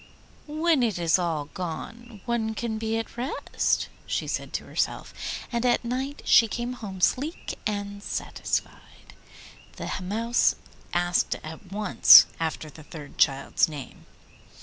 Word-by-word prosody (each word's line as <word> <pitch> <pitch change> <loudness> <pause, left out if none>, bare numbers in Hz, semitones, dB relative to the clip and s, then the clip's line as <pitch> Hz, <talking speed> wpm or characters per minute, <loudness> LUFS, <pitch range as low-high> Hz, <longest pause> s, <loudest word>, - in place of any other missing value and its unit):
'When 310 -1 +2
it 225 -6 +1
is 170 +1 +3
all 165 -4 -1
gone 210 +6 -7
one 225 -2 -1
can 220 -1 -3
be 225 0 -1
at 225 +1 -5
rest,' 255 +5 -1 0.2
she - - -1
said - - -3
to - - -2
herself, - - -2 0.4
and 235 -1 -1
at 245 -1 +2
night 265 +4 -3
she 230 - +6
came 240 +3 -3
home 200 -6 -8
sleek 290 - 0
and 205 -1 -4
satisfied. - - -4 0.6
The - - -6
Mouse 225 +6 +2 0.4
asked 175 0 +1
at 160 +4 -10
once 210 0 +8
after 160 -1 -2
the 155 - -13
third 150 -2 -11
child's 135 +3 +3
name. 145 -4 -9
215 Hz, 135 wpm, -26 LUFS, 175-240 Hz, 0.6 s, once